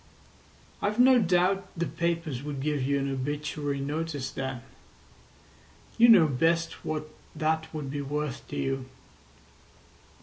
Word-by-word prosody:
"I've 210 +2 0
no 255 0 +7
doubt 185 0 +2
the 170 - 0
papers 165 -3 -2
would 145 -1 -5
give 145 0 -1
you 140 +2 +1
an 140 0 -1
obituary 145 +1 -3
notice 145 -1 -3
then. 130 -3 -4 1.3
You 235 +1 +6
know 200 -8 +8
best 165 +4 0
what 155 -1 -3 0.3
that 160 +1 0
would 150 -4 -5
be 145 0 -3
worth 145 -1 -4
to 145 - -7
you. 135 -2 -2
150 Hz, 130 wpm, -28 LUFS, 140-165 Hz, 1.3 s, know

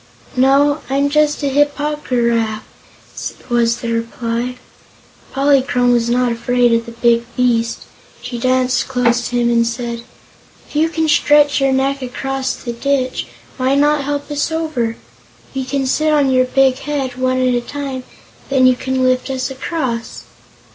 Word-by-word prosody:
"No, 275 +3 +3
I'm 280 +1 +1
just 300 0 +2
a 280 - +1
Hip 290 +1 +2
po 300 +1 -2
gy 255 - +1
raf," 230 -2 0 0.9
was 235 -1 +2
the 235 - -3
reply. 230 +1 -3 0.8
Polychrome 270 -3 +2
was 235 -1 +1
not 245 0 +2
afraid 240 +1 +2
of 230 0 0
the - - -7
big 235 0 +2
beast. 235 -2 +1 0.4
She 240 - -6
danced 255 +1 +1
close 240 -2 +1
to 245 - -4
him 240 0 +2
and 235 0 +3
said: 235 0 -4 0.7
"If - - -16
you 315 +2 +3
can 320 -1 -1
stretch 295 -1 +4
your 270 0 +3
neck 270 +1 0
across 260 +1 -3
the 240 - -6
ditch, 260 +1 -1 0.3
why 260 +1 +1
not 290 0 +2
help 285 +1 -3
us 290 +2 -1
over? 305 -9 -2 0.6
We 265 -1 -2
can 270 +1 -1
sit 310 +4 +1
on 285 -3 +3
your 255 0 +3
big 265 0 +2
head, 275 -3 -3
one 255 0 0
at 255 -1 +2
a 240 - +1
time, 270 0 -5
and - - -20 0.5
then 265 -2 +3
you 255 0 +5
can 260 +1 -2
lift 255 +1 +1
us 260 0 -2
across." 260 -4 -4
255 Hz, 170 wpm, -17 LUFS, 240-280 Hz, 0.9 s, you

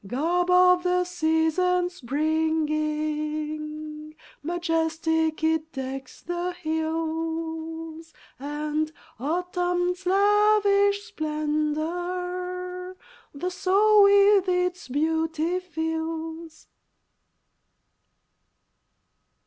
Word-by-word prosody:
Garb 340 - 0
of 360 0 +6
the 360 0 +2
season's 355 +1 +1
bringing, 305 +1 -2 0.3
Majestic 320 -1 0
it 320 0 +1
decks 265 -1 -6
the 350 +1 -3
hills, 325 0 -3 0.3
And 300 +2 -2 0.3
Autumn's 360 +4 -1
lavish 405 0 +4
splendor 360 +2 -3 0.4
The 360 +6 -3
soul 410 +3 +4
with 400 -1 +5
its 360 0 0
beauty 320 +4 0
fills. 320 -1 -5
325 Hz, 60 wpm, -25 LUFS, 310-360 Hz, 0.4 s, of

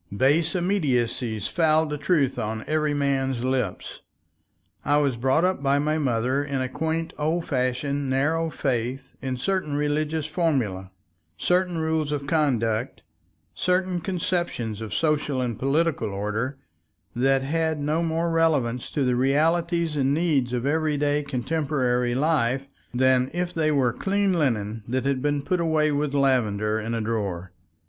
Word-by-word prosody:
Base 150 +7 +3
immediacies 125 - 0
fouled 160 -2 +2
the 150 - -2
truth 150 -4 +1
on 110 +1 -3
every 155 -1 0
man's 135 -3 0
lips. 130 -7 -2 0.8
I 145 - +3
was 140 -4 +2
brought 130 +7 +2
up 185 -6 0
by 140 0 +2
my 155 +2 +1
mother 130 0 0
in 140 -2 -2
a 130 - -1
quaint 160 +4 -2
old 160 +3 0
fashioned 135 +1 -1
narrow 160 +5 +1
faith 130 -1 -2
in 130 -1 -3
certain 185 0 -1
religious 150 +1 0
formulae, 135 - -1 0.5
certain 180 - +1
rules 160 -2 0
of 145 -1 -2
conduct, 125 -7 0 0.5
certain 180 0 0
conceptions 170 - -2
of 110 -3 -6
social 150 - 0
and 120 -4 -2
political 140 -3 +1
order, 105 +7 -2 0.6
that 135 +2 +2
had 160 +2 0
no 150 +3 0
more 165 0 0
relevance 145 -8 +1
to 145 - -1
the 125 -1 +2
realities 165 +5 +1
and 140 0 +2
needs 150 -7 +1
of 125 0 -2
everyday 145 -1 +1
contemporary 130 -3 -1
life 135 -3 +1 0.3
than 130 0 +3
if 175 0 -2
they 155 -2 +1
were 130 -5 +2
clean 200 +5 +1
linen 115 - 0
that 130 +3 -1
had 135 -2 0
been 145 0 0
put 180 +5 0
away 155 -2 +2
with 145 0 -1
lavender 110 -6 +1
in 115 +2 -3
a 115 - -1
drawer. 100 -5 -3
140 Hz, 145 wpm, -25 LUFS, 125-160 Hz, 0.8 s, Base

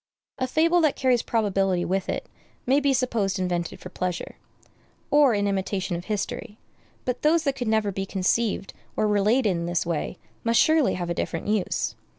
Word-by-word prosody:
A 255 - 0
fable 335 +6 +3
that 305 -3 +3
carries 255 -3 +2
probability 195 -5 +1
with 190 +1 -1
it - - -2 0.4
may 270 +3 +4
be 285 -1 +2
supposed 235 -7 0
invented 175 -2 -2
for 180 - -9
pleasure, 180 -1 -4 0.7
or 290 -6 +5
in 205 0 +1
imitation 190 -2 -1
of 175 +1 -6
history; 210 0 -4 0.5
but 250 0 -2
those 320 +2 +3
that 275 -3 +1
could 245 -4 -3
never 220 -2 +2
be 195 0 -4
conceived 195 +2 0 0.2
or 215 - +2
related 210 +3 +3
in 170 -1 -2
this 175 0 0
way 165 -3 -2 0.3
must 230 0 +3
surely 315 -3 +4
have 175 -1 -3
a - - +1
different 165 -1 -3
use. 210 -3 0
210 Hz, 175 wpm, -25 LUFS, 185-255 Hz, 0.7 s, or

